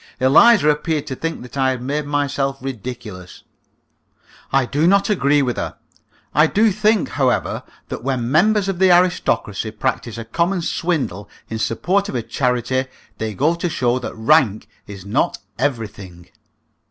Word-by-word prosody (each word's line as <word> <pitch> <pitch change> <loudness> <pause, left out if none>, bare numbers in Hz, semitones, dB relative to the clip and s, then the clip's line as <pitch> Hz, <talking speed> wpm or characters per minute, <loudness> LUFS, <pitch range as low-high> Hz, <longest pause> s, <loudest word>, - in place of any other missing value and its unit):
Eliza 160 - +6
appeared 150 0 0
to 130 - -5
think 165 +1 -4
that 125 - -12
I 135 -1 +2
had 130 -2 -2
made 145 +3 -2
myself 140 -1 -1
ridiculous. 115 -8 -8 1.1
I 135 -1 +3
do 145 +6 +1
not 200 +2 +3
agree 145 -6 +3
with 125 -2 -2
her. - - -4 0.6
I 155 +2 +5
do 215 +5 +3
think, 215 0 +1
however, 130 -3 0 0.3
that - - -6
when 125 -2 -1
members 205 +6 +3
of 190 -2 -2
the 190 -1 +5
aristocracy 175 - +1
practise 115 0 -3
a 115 - -6
common 170 - 0
swindle 140 - -2 0.2
in 110 - -3
support 190 - 0
of - - -5
a 120 - -1
charity, 125 +1 0 0.3
they 110 -1 -3
go 150 - +2
to 170 +1 -2
show 125 -5 0
that 125 - -6
rank 115 -2 +2 0.2
is 100 -2 -10
not 130 +12 0 0.2
everything. 105 -9 -4
135 Hz, 155 wpm, -20 LUFS, 120-170 Hz, 1.1 s, Eliza